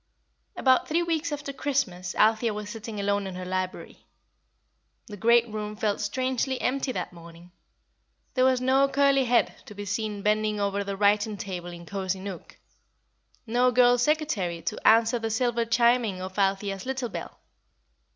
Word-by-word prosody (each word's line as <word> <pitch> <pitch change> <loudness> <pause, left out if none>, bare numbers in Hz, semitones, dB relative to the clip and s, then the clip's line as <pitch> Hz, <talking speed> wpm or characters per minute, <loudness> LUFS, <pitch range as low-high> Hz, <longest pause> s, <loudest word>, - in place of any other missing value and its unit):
_ - - -48 0.6
About 260 -1 +3
three 335 +3 +1
weeks 330 -1 -1
after 285 -1 -5
Christmas 220 -11 -2
Althea 220 0 +3
was 210 0 -6
sitting 225 -2 -7
alone 200 0 0
in 190 - -7
her 185 0 -6
library. 185 0 -5 1.0
The 210 - -9
great 235 +3 +4
room 210 -1 -5
felt 210 -1 -1
strangely 255 +4 -1
empty 270 0 -1
that - - -4
morning. 170 +1 -14 0.8
There 255 - +2
was 260 -1 +3
no 265 +2 +3
curly 275 -1 +3
head 240 0 +2
to 210 - -10
be 205 0 -6
seen 210 0 -3
bending 215 0 +1
over 200 0 0
the 200 0 -5
writing 205 +1 +2
table 180 -3 -6
in 170 0 -10
Cosy 190 0 -3
Nook; 190 -2 -8 0.9
no 245 +2 +3
girl 245 0 +5
secretary 240 - 0
to - - -2
answer 225 +2 +5
the 225 0 -3
silver 235 +1 0
chiming 235 -3 +2
of 185 +2 -6
Althea's 195 +2 0
little 265 -2 -2
bell. - - -7
215 Hz, 160 wpm, -26 LUFS, 195-250 Hz, 1.0 s, girl